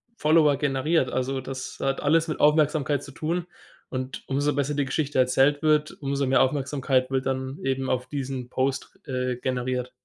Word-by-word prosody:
Follower 150 -4 +4
generiert. 140 +1 +1
Also, 130 +1 -1
das 130 0 -7
hat 135 0 -1
alles 165 +3 +3
mit 155 - -3
Aufmerksamkeit 150 -2 +3
zu 140 - -10
tun, 170 +5 -2 0.4
und 130 0 -5
umso 145 +1 +1
besser 145 +1 0
die 145 -1 0
Geschichte 145 0 -2
erzählt 135 +3 +3
wird, 155 -1 +3
umso 140 0 -1
mehr 130 - +4
Aufmerksamkeit 135 -1 +1
wird 130 0 0
dann 130 +1 -2
eben 135 0 -1
auf 125 0 -1
diesen 135 -3 -4
Post, 130 0 -2
äh, 125 -2 -2
generiert. 125 0 -2
135 Hz, 165 wpm, -25 LUFS, 130-150 Hz, 0.4 s, Follower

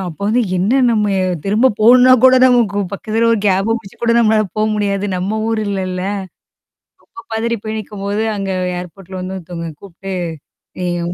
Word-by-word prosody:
அப்ப 160 - -15
வந்து 240 +3 +2 0.2
என்ன 195 +5 0 0.2
நம்ம 210 -2 +1 0.4
திரும்ப 225 +6 +3
போணும்ன்னா 250 +3 +7
கூட 260 0 +7
நமக்கு 230 -5 +2
பக்கத்துல 225 +3 0
ஒரு 225 - +1
கேப 195 +2 +1
புடிச்சு 195 - -15
கூட 235 - +3
நம்மளால 215 -2 +3
போக 215 - +2
முடியாது. 200 -1 -1
நம்ம 200 +4 -2
ஊர் 225 -1 0
இல்லல்ல. 185 -2 -3 1.0
ரொம்ப 230 - -14
பதரி 235 +1 -1
போய் 220 0 -4
நிக்கும்போது, 205 +1 -4
அங்க 195 -1 -3 0.3
ஏர்போர்ட்ல 185 +1 -9
வந்து 185 +1 -5
ஒருத்தவங்க 170 -1 -7
கூப்புட்டு 195 0 -8 0.7
ஏய் 175 -1 -2
205 Hz, 155 wpm, -17 LUFS, 190-225 Hz, 1.0 s, போணும்ன்னா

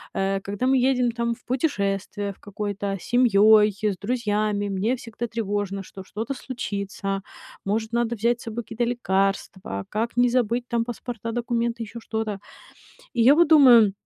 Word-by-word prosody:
Э, 195 0 0
когда 200 +5 -2
мы 265 - +4
едем 250 -2 +1
там 235 0 -1
в - - -26
путешествие 205 -6 -1
в - - -28
какое-то, 205 -1 -4
семьей, 215 -3 +5 0.2
с - - -12
друзьями, 210 -2 -1
мне 200 +5 0
всегда 235 0 -6
тревожно, 205 -3 -3
что 190 0 -10
что-то 220 +7 -4
случится, 200 -6 -4 0.4
может, 220 +3 -1
надо 235 0 +1
взять 235 +2 +1
с - - -11
собой 230 +1 -4
какие-то 230 +2 -2
лекарства, 195 - -1
как 230 +3 -2
не 245 0 +5
забыть, 240 -1 +1
там, 230 -1 0
паспорта, 235 -1 -5
документы, 235 0 -1
ещё 225 +2 -8
что-то. 220 -1 -3 0.8
И 240 - 0
я 260 +5 +7
вот 340 +1 +4
думаю, 245 -9 +7
225 Hz, 160 wpm, -24 LUFS, 200-240 Hz, 0.8 s, я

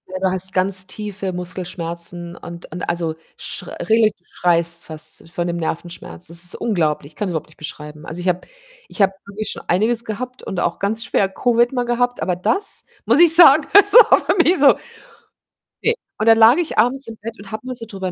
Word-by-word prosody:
Ja 185 - -6
du 190 0 +1
hast 190 +1 -1
ganz 185 0 0
tiefe 205 -1 -5
Muskelschmerzen 175 -1 -5
und 170 0 -11
und 180 +3 -5
also, 170 -2 -2 0.2
sch - - -6
regelrecht 220 -2 +1
du - - -41
schreist 170 -1 +1
fast 155 +1 -5
von 175 0 -3
dem 175 0 -2
Nervenschmerz. 170 +1 -5
Das 170 +1 0
ist 175 - +2
unglaublich. 155 -9 -1
Ich - - -22
kann's 200 +1 -3
überhaupt 160 -2 -4
nicht 155 - -23
beschreiben. 150 0 -9
Also, 170 +1 -6
ich 180 - -4
habe 180 0 +1 0.5
ich - - -5
habe 195 0 +4
wirklich 200 +1 -5
schon - - -8
einiges 220 +6 +1
gehabt 250 +3 -6
und 190 - -4
auch 170 - -1
ganz 220 +3 -1
schwer 195 - +1
Covid 240 +4 +1
mal 245 -2 -1
gehabt, 245 +1 -1
aber 180 - 0
das 390 - -1 0.2
muss 235 +7 +3
ich 340 -2 +7
sagen, 315 -3 +7
das 405 0 +6
war 460 -1 +8
für 360 - +2
mich 360 +3 +3
so 280 -2 +6 1.1
ne, 465 - +3 0.3
und 215 - 0
dann 225 0 +7
lag 225 +4 +7
ich 345 -2 -2
abends 255 +5 +1
im 225 -1 -9
Bett 225 +2 -7
und 200 -1 -12
habe 215 +2 -6
mal 255 0 -5
so 235 -1 -8
drüber 190 -4 -5
195 Hz, 210 wpm, -19 LUFS, 175-235 Hz, 1.1 s, war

